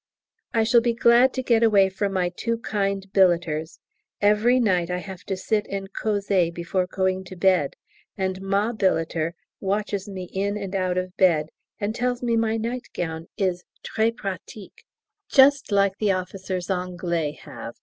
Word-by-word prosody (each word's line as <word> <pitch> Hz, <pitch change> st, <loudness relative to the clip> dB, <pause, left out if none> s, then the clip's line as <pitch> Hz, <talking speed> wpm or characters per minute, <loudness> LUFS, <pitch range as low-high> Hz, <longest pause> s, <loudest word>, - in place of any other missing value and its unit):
I 225 Hz, -, +2 dB
shall 235 Hz, +2 st, +5 dB
be 235 Hz, -1 st, 0 dB
glad 235 Hz, +2 st, +5 dB
to 260 Hz, -, -2 dB
get 235 Hz, -2 st, +3 dB
away 205 Hz, -4 st, +5 dB
from 195 Hz, +1 st, -2 dB
my 180 Hz, -2 st, +1 dB
too 230 Hz, +3 st, -1 dB
kind 200 Hz, -3 st, -2 dB
billeters; 170 Hz, -4 st, +2 dB, 0.4 s
every 210 Hz, +5 st, +4 dB
night 180 Hz, -7 st, +2 dB
I 180 Hz, -, -1 dB
have 185 Hz, 0 st, -8 dB
to 195 Hz, -, -3 dB
sit 210 Hz, +2 st, -1 dB
and 195 Hz, 0 st, -5 dB
causer 200 Hz, -5 st, +1 dB
before 175 Hz, +2 st, -2 dB
going 190 Hz, 0 st, -1 dB
to 185 Hz, -, -9 dB
bed, 180 Hz, -5 st, +2 dB, 0.4 s
and 190 Hz, -1 st, -2 dB
Ma 200 Hz, +3 st, +1 dB
billeter 165 Hz, -5 st, 0 dB, 0.2 s
watches 200 Hz, 0 st, -2 dB
me 190 Hz, -2 st, -6 dB
in 200 Hz, +2 st, -1 dB
and 195 Hz, -1 st, -5 dB
out 185 Hz, -1 st, 0 dB
of 185 Hz, 0 st, -3 dB
bed, 160 Hz, -5 st, +3 dB, 0.3 s
and 210 Hz, 0 st, -1 dB
tells 245 Hz, +1 st, -1 dB
me 235 Hz, -1 st, +1 dB
my 225 Hz, 0 st, +1 dB
nightgown 175 Hz, -9 st, -4 dB
is 185 Hz, -3 st, 0 dB, 0.2 s
très 225 Hz, +1 st, 0 dB
pratique, 195 Hz, -1 st, -8 dB
and -, -, -62 dB
just 275 Hz, -2 st, +6 dB
like 200 Hz, -1 st, +3 dB
the 210 Hz, -2 st, +2 dB
officers 185 Hz, 0 st, -4 dB
Anglais 175 Hz, -4 st, -2 dB
have. 115 Hz, -4 st, -9 dB
195 Hz, 165 wpm, -24 LUFS, 180-215 Hz, 0.4 s, just